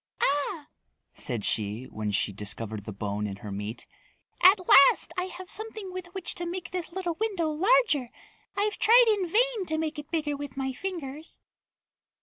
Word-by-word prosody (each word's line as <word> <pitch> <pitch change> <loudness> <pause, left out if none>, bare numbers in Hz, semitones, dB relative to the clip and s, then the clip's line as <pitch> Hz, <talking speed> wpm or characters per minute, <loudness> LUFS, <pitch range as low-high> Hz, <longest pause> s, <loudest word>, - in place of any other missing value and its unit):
"Ah," 290 +2 +1 0.5
said 120 -6 -3
she 105 +2 0
when 110 -4 -5
she 100 0 0
discovered 105 +1 -4
the 110 - -5
bone 105 +1 -3
in 100 - -5
her 100 +1 -9
meat. 105 +3 -5 0.6
"At 380 +3 +8
last 275 - +6
I 360 -1 -1
have 370 0 -8
something 435 -3 -2
with 370 -1 -6
which 380 - 0
to 345 - -2
make 345 -1 -5
this 360 -2 -3
little 350 -2 -3
window 390 -8 0
larger. 340 - +3 0.5
I've 415 +1 0
tried 480 +2 +7
in 405 -4 +1
vain 445 0 +1
to 315 - 0
make 315 -1 -2
it 295 +1 -9
bigger 305 -3 -1
with 280 -2 -8
my 265 -1 -2
fingers." 315 -2 -6
315 Hz, 170 wpm, -27 LUFS, -, 0.6 s, At